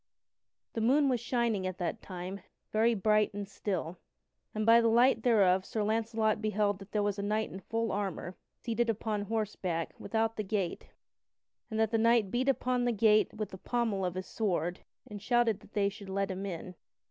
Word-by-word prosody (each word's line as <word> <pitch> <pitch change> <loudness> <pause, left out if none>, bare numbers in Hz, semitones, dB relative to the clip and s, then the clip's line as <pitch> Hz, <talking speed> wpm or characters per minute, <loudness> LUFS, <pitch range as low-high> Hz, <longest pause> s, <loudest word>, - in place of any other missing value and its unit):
The 225 - -2
moon 275 +5 +4
was 250 -2 +1
shining 235 -5 0
at 185 -1 -5
that 175 -3 -3
time, 185 +1 -6 0.3
very 225 +2 +3
bright 210 0 +2
and 205 -1 -4
still, 185 -4 -4 0.6
and 215 0 -1
by 230 +1 +7
the 230 - +3
light 235 +1 +4
thereof 195 -6 +4
Sir 215 +2 -2
Launcelot 220 0 0
beheld 210 -2 0
that 195 +1 -12
there 210 -1 +1
was 205 0 -1
a - - -1
knight 215 +2 -1
in 190 - -7
full 225 +4 -2
armor 190 -2 -3 0.2
seated 235 0 -1
upon 215 -1 -1
horseback 200 -6 -2
without 225 0 -1
the 215 - -1
gate, 190 -3 -3 0.8
and 220 -1 -3
that 220 -1 +2
the 225 - +2
knight 230 -3 +3
beat 255 +3 +1
upon 255 -2 +1
the 240 - +2
gate 215 -1 +4
with 215 -2 -3
the 190 - -10
pommel 225 -5 -1
of 180 -1 -2
his 185 0 -4
sword, 180 -5 -1 0.3
and 205 -1 -8
shouted 235 -2 +2
that 205 - -19
they 205 -2 +2
should 200 0 -7
let 195 0 -1
him 190 +2 -4
in. 180 0 -6
215 Hz, 195 wpm, -31 LUFS, 195-225 Hz, 0.8 s, by